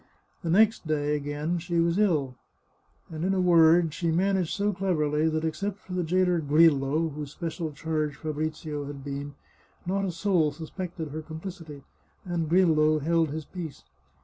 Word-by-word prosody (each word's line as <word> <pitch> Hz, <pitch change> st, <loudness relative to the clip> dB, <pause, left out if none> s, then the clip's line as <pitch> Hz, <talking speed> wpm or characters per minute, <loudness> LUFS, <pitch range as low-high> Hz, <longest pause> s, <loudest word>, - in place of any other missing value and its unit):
The 170 Hz, -, -3 dB
next 210 Hz, 0 st, +3 dB
day, 150 Hz, -1 st, 0 dB
again, 150 Hz, +4 st, -2 dB
she 170 Hz, 0 st, -1 dB
was 170 Hz, +3 st, +2 dB
ill, 155 Hz, -11 st, +2 dB, 0.8 s
and, 160 Hz, 0 st, -5 dB
in 195 Hz, +1 st, +1 dB
a -, -, +1 dB
word, 165 Hz, -2 st, +5 dB
she 170 Hz, +1 st, -1 dB
managed 185 Hz, +1 st, +1 dB
so 205 Hz, 0 st, 0 dB
cleverly 160 Hz, -5 st, +1 dB
that, 155 Hz, 0 st, -1 dB
except 195 Hz, +5 st, -2 dB
for 185 Hz, -, -11 dB
the 180 Hz, -, 0 dB
jailer 180 Hz, +1 st, +2 dB
Grillo, 155 Hz, 0 st, +3 dB
whose 150 Hz, -1 st, -6 dB
special 165 Hz, -1 st, -4 dB
charge 155 Hz, -1 st, -2 dB
Fabrizio 155 Hz, -1 st, -4 dB
had 140 Hz, -1 st, -8 dB
been, 140 Hz, 0 st, -5 dB, 0.5 s
not 195 Hz, +2 st, 0 dB
a 185 Hz, -, -1 dB
soul 170 Hz, -3 st, +1 dB
suspected 165 Hz, +1 st, -6 dB
her 155 Hz, +2 st, -5 dB
complicity, 160 Hz, -2 st, -8 dB, 0.4 s
and 170 Hz, -3 st, -2 dB
Grillo 155 Hz, -3 st, +4 dB
held 165 Hz, +1 st, +1 dB
his 155 Hz, +1 st, -5 dB
peace. 165 Hz, -6 st, -8 dB
160 Hz, 160 wpm, -27 LUFS, 150-180 Hz, 0.8 s, word